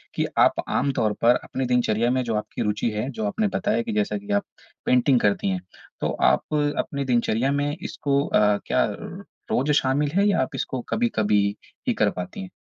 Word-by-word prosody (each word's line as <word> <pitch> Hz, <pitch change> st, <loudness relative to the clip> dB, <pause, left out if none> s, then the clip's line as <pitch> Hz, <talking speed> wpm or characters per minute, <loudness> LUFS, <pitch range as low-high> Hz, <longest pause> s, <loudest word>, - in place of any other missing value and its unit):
कि -, -, +1 dB
आप -, -, +6 dB, 0.2 s
आम 140 Hz, +1 st, +1 dB
तौर 110 Hz, -4 st, +1 dB
पर 120 Hz, +1 st, +5 dB
अपनी 130 Hz, 0 st, -3 dB
दिनचर्या 120 Hz, -2 st, +1 dB
में 130 Hz, 0 st, +1 dB
जो 115 Hz, -2 st, -2 dB
आपकी 105 Hz, -, -4 dB
रुचि 105 Hz, +2 st, 0 dB
है, 105 Hz, +5 st, -3 dB
जो 110 Hz, -5 st, -4 dB
आपने 210 Hz, -, 0 dB
बताया 210 Hz, +3 st, 0 dB
कि 230 Hz, -2 st, -4 dB
जैसा 210 Hz, 0 st, 0 dB
कि 205 Hz, +1 st, -8 dB
आप 205 Hz, 0 st, +2 dB, 0.4 s
पेंटिंग 125 Hz, +1 st, +4 dB
करती 100 Hz, -2 st, +1 dB
हैं, 95 Hz, -1 st, -2 dB, 0.4 s
तो -, -, 0 dB
आप -, -, +2 dB, 0.3 s
अपनी 140 Hz, -1 st, -2 dB
दिनचर्या 120 Hz, 0 st, +1 dB
में 145 Hz, +1 st, 0 dB
इसको 140 Hz, -4 st, -1 dB
अ, 105 Hz, -1 st, +3 dB
क्या -, -, +2 dB, 0.7 s
रोज़ 140 Hz, +4 st, +2 dB
शामिल 145 Hz, +1 st, +2 dB
है 200 Hz, +1 st, +4 dB
या 200 Hz, -, +2 dB
आप 130 Hz, +2 st, -3 dB
इसको 130 Hz, -1 st, -3 dB
कभी-कभी 110 Hz, -, +1 dB, 0.5 s
ही -, -, +3 dB
कर -, -, +2 dB
पाती 90 Hz, +1 st, -6 dB
हैं? 95 Hz, -, -7 dB
130 Hz, 195 wpm, -24 LUFS, 110-145 Hz, 0.7 s, आप